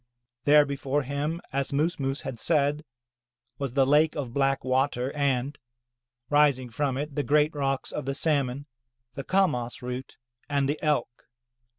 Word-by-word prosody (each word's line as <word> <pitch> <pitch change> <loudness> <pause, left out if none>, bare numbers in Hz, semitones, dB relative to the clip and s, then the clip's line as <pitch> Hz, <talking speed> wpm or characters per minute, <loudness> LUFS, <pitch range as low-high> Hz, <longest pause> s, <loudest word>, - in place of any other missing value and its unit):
There 150 0 +7
before 140 0 -1
him, 145 +5 -3
as 140 0 -1
Moos 150 +5 0
Moos 135 +1 -2
had 130 -5 -6
said, 150 0 +1 0.8
was 135 -4 -3
the 135 0 +4
lake 150 +3 +3
of 135 -6 -4
black 135 0 +1
water 130 0 0
and, 140 -1 0 0.7
rising 140 -4 +3
from 135 +2 -1
it, 145 +1 -4
the 145 - 0
giant 150 +4 +3
rocks 135 -2 -2
of 150 - -4
the 135 0 -2
salmon, 140 -3 0 0.5
the 140 - -5
kamas 135 -11 0
root, 125 +1 -6 0.3
and 140 -1 +1
the 145 +2 -2
Elk. 150 -5 -1
140 Hz, 155 wpm, -27 LUFS, 130-150 Hz, 0.8 s, There